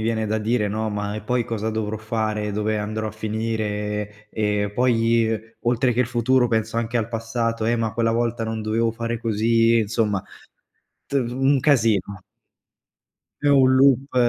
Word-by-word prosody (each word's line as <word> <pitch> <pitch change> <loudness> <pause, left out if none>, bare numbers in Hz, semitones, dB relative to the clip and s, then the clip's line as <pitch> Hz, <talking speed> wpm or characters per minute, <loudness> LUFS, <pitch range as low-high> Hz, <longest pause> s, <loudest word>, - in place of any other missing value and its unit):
viene 110 0 0
da 110 +1 -1
dire, 110 0 0
no, 110 +2 -2
"ma 105 0 -3
e 110 - -4
poi 125 +1 0
cosa 110 -1 -3
dovrò 110 -1 -3
fare, 110 -1 -2
dove 105 +1 -1
andrò 110 +1 -3
a - - -5
finire." 105 -1 -3
E 105 -1 -1
poi, 115 -2 +2
ehm, 110 -1 0 0.3
oltre 120 +1 +2
che 120 - 0
il 125 - +2
futuro 125 +1 +2
penso 110 0 0
anche 115 +1 -2
al 115 -2 0
passato: 115 0 -2
"Eh, 120 +1 +2
ma 115 -1 -1
quella 115 0 +1
volta 115 0 -1
non 110 -1 -3
dovevo 115 +1 +1
fare 115 0 -3
così"; 115 +1 +2
insomma 105 -2 0 0.8
t - - -20
un 135 +1 +1
casino. 110 -8 +2 1.2
È 145 - +2
un 135 -2 +5
loop. 135 0 +3
115 Hz, 170 wpm, -23 LUFS, 110-120 Hz, 1.2 s, un